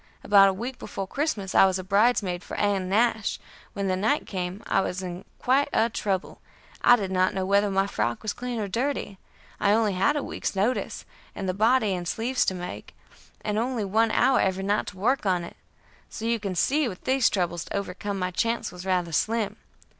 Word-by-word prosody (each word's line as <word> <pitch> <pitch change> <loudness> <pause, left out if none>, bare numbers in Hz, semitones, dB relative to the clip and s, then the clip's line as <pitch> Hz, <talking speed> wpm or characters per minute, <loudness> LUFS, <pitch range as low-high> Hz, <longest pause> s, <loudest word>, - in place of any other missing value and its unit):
About 200 -1 +6
a - - 0
week 245 +6 -5
before 195 -1 -5
Christmas 210 -5 -2
I 195 - +7
was 190 0 -1
bridesmaid 200 -2 +1
for - - -7
Ann 195 -3 0
Nash; 220 +1 +1 0.3
when 200 -1 -2
the 185 - +1
night 220 +10 +1
came 185 +1 -4
I 195 - +2
was 190 0 -3
in 180 0 -6
quite 275 +3 +2
a 230 +1 +2
trouble; 190 -3 -2 0.4
I 245 - +7
did 195 -5 -3
not 185 0 +2
know 190 -1 -1
whether 200 +1 +3
my 195 0 +2
frock 120 - -2
was 215 - -2
clean 245 -1 -4
or 210 - -2
dirty; 230 -3 -2 0.4
I 200 - +3
only 215 -2 +2
had 195 +11 +2
a 290 - -1
week's - - -4
notice, 215 +6 -1 0.3
and 190 - -4
the 185 - 0
body 220 +1 +3
and 175 -1 -4
sleeves 245 +7 0
to 190 - 0
make, 180 0 -7 0.5
and 210 0 -1
only 235 -2 -1
one 220 +3 +2
hour 255 +4 +3
every 190 0 0
night 205 +2 0
to 195 - -8
work 235 +3 +1
on 180 -2 +1
it, 170 - -9 0.5
so 225 - -6
you 230 0 +1
can 200 -3 -4
see 285 - +2
with 185 -5 -7
these 260 -2 +3
troubles 175 -3 -1
to - - -3
overcome 200 +1 -4
my 185 -1 -2
chance 230 +6 -1
was 180 +1 -9
rather 180 -2 0
slim. 215 +4 0
200 Hz, 205 wpm, -26 LUFS, 185-230 Hz, 0.5 s, I